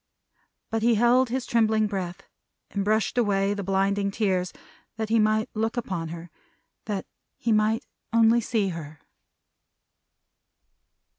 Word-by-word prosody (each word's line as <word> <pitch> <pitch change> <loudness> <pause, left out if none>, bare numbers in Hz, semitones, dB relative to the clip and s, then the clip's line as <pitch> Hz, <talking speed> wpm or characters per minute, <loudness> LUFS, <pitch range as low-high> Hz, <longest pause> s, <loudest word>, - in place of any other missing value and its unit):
But 225 0 0
he 235 +1 +4
held 240 +3 +4
his 255 +1 -2
trembling 220 -2 +2
breath, 190 -4 -4 0.5
and 200 - -1
brushed 215 +3 +1
away 200 -3 +2
the 205 - -4
blinding 195 +1 +1
tears, 190 -3 0 0.5
that 220 -1 -3
he 225 0 +3
might 215 +1 +2
look 225 +2 -1
upon 185 -8 -3
her; 165 +1 -8 0.5
that 200 -3 -3 0.3
he 235 - -1
might 215 +1 +2 0.3
only 230 +1 +5
see 215 -4 0
her. 155 -3 -7
215 Hz, 130 wpm, -26 LUFS, 195-225 Hz, 0.5 s, only